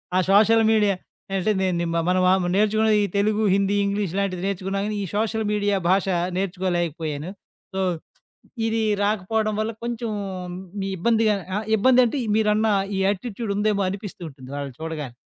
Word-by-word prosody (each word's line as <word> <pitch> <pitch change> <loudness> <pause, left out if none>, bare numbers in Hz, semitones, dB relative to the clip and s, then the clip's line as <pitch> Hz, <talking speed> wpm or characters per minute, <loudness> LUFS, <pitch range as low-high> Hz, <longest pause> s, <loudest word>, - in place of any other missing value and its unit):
ఆ - - +4
social 220 +3 +5
media 210 -3 +3 0.4
అంటే, 195 +3 +1
నేను 185 -2 +1
నీ - - 0
మా 170 - +2
మనం 185 0 +2
ఆహ్, 190 -1 +3
నేర్చుకున్న 215 +1 +3
ఈ - - +2
తెలుగు, 215 +1 +2
హిందీ, 200 +1 +2
ఇంగ్లీష్ 200 -3 -1
లాంటివి 190 -2 -1
నేర్చుకున్నాం 195 0 -2
గానీ, 215 - -3
ఈ - - -2
సోషల్ 220 +1 0
మీడియా 205 -1 +1
భాష 190 +1 +3 0.3
నేర్చుకోలేకపోయాను. 175 -4 -2 0.4
సో, 190 - -2 0.9
ఇది 225 0 0 0.2
రాకపోవడం 215 +1 0
వల్ల 215 +1 -1
కొంచెం 235 -1 -3 0.9
ఇబ్బందిగా 220 +3 +2 0.2
ఆహ్, 215 - -3
ఇబ్బంది 255 +4 +5
అంటే 260 +5 -1 0.2
మీరన్న 215 0 +2 0.3
ఈ - - 0
యాటిట్యూడ్ 205 +2 -2
ఉందేమో 205 -1 +1
అనిపిస్తూ 200 -1 -7
ఉంటుంది 130 -2 -13
వాళ్ళని 140 -3 -6
చూడగానే. 150 -6 -5
200 Hz, 155 wpm, -23 LUFS, 185-220 Hz, 0.9 s, సోషల్